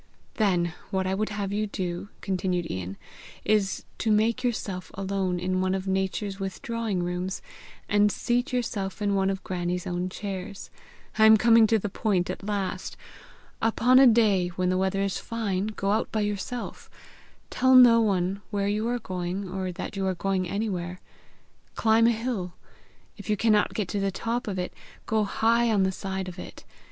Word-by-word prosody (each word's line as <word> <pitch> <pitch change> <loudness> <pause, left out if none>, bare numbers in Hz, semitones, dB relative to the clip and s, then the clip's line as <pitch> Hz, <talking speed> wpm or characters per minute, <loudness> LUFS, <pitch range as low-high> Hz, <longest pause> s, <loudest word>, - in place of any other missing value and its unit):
"Then 180 -6 +2 0.2
what 190 -2 -1
I 190 - 0
would 215 +3 -1
have 200 -2 -3
you 210 +1 0
do," 185 -1 -4
continued 185 -2 -1
Ian, 95 +1 -5 0.5
"is 205 -3 +1
to 220 - +1
make 220 +3 +2
yourself 195 -7 -2
alone 190 -2 -1
in 185 +1 0
one 185 0 +1
of 190 0 -4
Nature's 190 +1 -1
withdrawing 200 0 -3
rooms, 180 +1 -3 0.5
and 205 0 +3
seat 245 +4 0
yourself 210 -6 -2
in 205 -1 0
one 195 -1 +2
of 195 -1 -3
Grannie's 180 -1 -2
own 180 +1 -2
chairs. 195 0 -6 0.5
I 220 - +8
am 220 0 +8
coming 230 0 +6
to 225 - +3
the 210 - -3
point 195 -3 0
at - - -7
last! 200 -2 -3 0.6
Upon 245 +3 +4
a 270 - +8
day 215 -6 +4
when 180 +1 -1
the 185 - +1
weather 190 +1 +1
is 195 -2 -1
fine, 210 -4 -2
go 200 -2 -2
out 215 - 0
by 215 - 0
yourself. 210 +4 -4 0.6
Tell 260 +1 +4
no 240 -2 +8
one 195 -2 0
where 200 -2 -1
you 210 +2 0
are 245 +1 0
going, 185 -2 -4
or 185 0 -3
that 185 +3 -6
you 195 -1 -1
are 185 - 0
going 185 -1 -1
anywhere. 185 -3 -3 0.8
Climb 225 +1 +4
a - - +5
hill. 225 -6 -3 0.6
If 205 -2 -10
you 210 - +2
cannot 215 -1 +2
get 210 -4 -1
to 205 - -1
the 195 0 +1
top 230 +5 -3
of 195 -2 -3
it, 180 0 -3 0.3
go 220 -1 +1
high 230 +3 +2
on 205 -3 +3
the 190 - +2
side 190 0 -4
of 180 0 -8
it. - - -9
195 Hz, 180 wpm, -26 LUFS, 185-220 Hz, 0.8 s, I